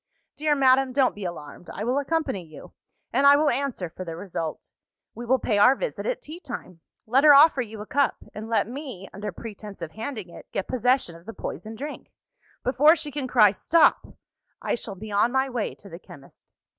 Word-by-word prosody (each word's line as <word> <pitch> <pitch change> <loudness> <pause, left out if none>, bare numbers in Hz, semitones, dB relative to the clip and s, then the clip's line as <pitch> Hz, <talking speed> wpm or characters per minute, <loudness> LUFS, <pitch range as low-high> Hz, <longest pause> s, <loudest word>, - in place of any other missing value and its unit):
"Dear 300 0 +1
madam, 265 -1 +3
don't 265 -1 +3
be 205 -2 -7
alarmed! 170 -1 -8
I 210 - -5
will 250 +5 +1
accompany 285 - -2
you; 155 -3 -13 0.4
and 275 +3 +4
I 285 - +9
will 295 0 +3
answer 255 -8 -2
for 170 +3 -8
the 165 -2 -6
result. 165 -4 -5 0.4
We 240 0 -8
will 260 +2 +4
pay 215 -4 0
our 250 +6 +6
visit - - -4
at - - -2
tea 315 +3 -9
time. 225 - -8 0.3
Let 255 +5 +3
her 295 -2 +9
offer 285 -1 +6
you 220 -3 -7
a - - -7
cup 280 +4 +1 0.2
and 220 +1 -7
let 220 -3 +1
me 250 -7 -7
(under 205 +1 -5
pretence 210 0 -9
of 165 -2 -6
handing 220 -3 -6
it) - - -13
get 195 - -3
possession 250 -7 +1
of 170 +4 -16
the 225 - -6
poisoned 220 0 -7
drink. 290 +4 -7 0.5
Before 290 +6 +5
she 315 -3 -5
can 280 -2 -3
cry 215 -5 +5
Stop! 330 - +2 0.4
I - - -2
shall 220 -4 -5
be 210 +3 -9
on 205 +4 +2
my 265 +1 +1
way 240 -4 -3
to 205 - -15
the 170 -3 -10
chemist. 140 -6 -16
235 Hz, 205 wpm, -25 LUFS, 200-275 Hz, 0.5 s, I